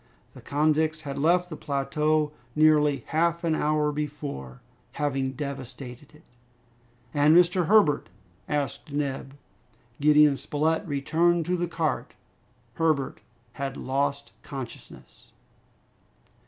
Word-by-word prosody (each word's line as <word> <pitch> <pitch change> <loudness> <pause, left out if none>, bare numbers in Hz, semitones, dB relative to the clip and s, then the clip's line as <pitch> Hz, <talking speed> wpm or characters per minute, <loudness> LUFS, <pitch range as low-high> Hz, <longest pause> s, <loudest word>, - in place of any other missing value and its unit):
The - - -13
convicts 155 +1 +1
had 140 -2 -5
left 175 +4 +2
the - - -4
plateau 150 +2 0 0.2
nearly 150 -4 +4
half 170 +2 +1
an 165 -1 +1
hour 150 -1 +1
before, 145 - -5 0.3
having 135 -2 -1
devastated 135 0 -7
it! 150 - -19 0.9
"And 150 +3 +5
Mr. 180 -1 +3
Herbert?" 200 - +4 0.4
asked 145 0 -3
Neb. 140 -1 -3 0.6
Gideon 150 -1 +5
Spilett 160 +7 -1
returned 165 +4 +1
to 180 - 0
the 175 0 -1
cart. 165 -2 -2 0.6
Herbert 155 -5 +1 0.3
had 135 0 -4
lost 140 +1 -2
consciousness! 135 -4 -10
150 Hz, 105 wpm, -26 LUFS, 140-160 Hz, 0.9 s, And